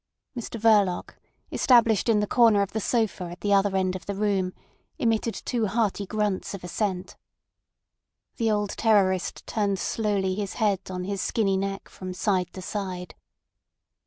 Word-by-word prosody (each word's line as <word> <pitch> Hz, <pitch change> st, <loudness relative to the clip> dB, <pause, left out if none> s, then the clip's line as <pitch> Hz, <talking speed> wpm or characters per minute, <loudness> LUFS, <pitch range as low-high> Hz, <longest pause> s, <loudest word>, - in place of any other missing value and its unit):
Mr 235 Hz, -1 st, -5 dB
Verloc, 205 Hz, -5 st, +3 dB, 0.4 s
established 230 Hz, -3 st, +4 dB
in 210 Hz, -2 st, +4 dB
the -, -, +1 dB
corner 225 Hz, -3 st, +4 dB
of 200 Hz, -, -5 dB
the 220 Hz, -, -2 dB
sofa 220 Hz, -5 st, 0 dB
at 175 Hz, 0 st, -9 dB
the 205 Hz, -1 st, +1 dB
other 195 Hz, 0 st, +3 dB
end 185 Hz, -1 st, 0 dB
of 185 Hz, -, -8 dB
the 200 Hz, -, -2 dB
room, 195 Hz, -3 st, 0 dB, 0.5 s
emitted 230 Hz, -4 st, 0 dB
two 230 Hz, -3 st, -1 dB
hearty 205 Hz, -1 st, 0 dB
grunts 210 Hz, -2 st, -1 dB
of 190 Hz, -, -10 dB
assent. 185 Hz, 0 st, -3 dB, 1.2 s
The 225 Hz, -1 st, +1 dB
old 210 Hz, -1 st, 0 dB
terrorist 195 Hz, -5 st, +1 dB
turned 200 Hz, -3 st, 0 dB
slowly 200 Hz, -2 st, 0 dB
his 200 Hz, 0 st, -3 dB
head 205 Hz, -4 st, +2 dB
on 180 Hz, -1 st, -4 dB
his 195 Hz, 0 st, -3 dB
skinny 195 Hz, -2 st, +1 dB
neck 195 Hz, +1 st, -3 dB
from 185 Hz, -1 st, -8 dB
side 185 Hz, -2 st, 0 dB
to 185 Hz, -, -8 dB
side. 185 Hz, -2 st, -5 dB
200 Hz, 160 wpm, -26 LUFS, 190-220 Hz, 1.2 s, established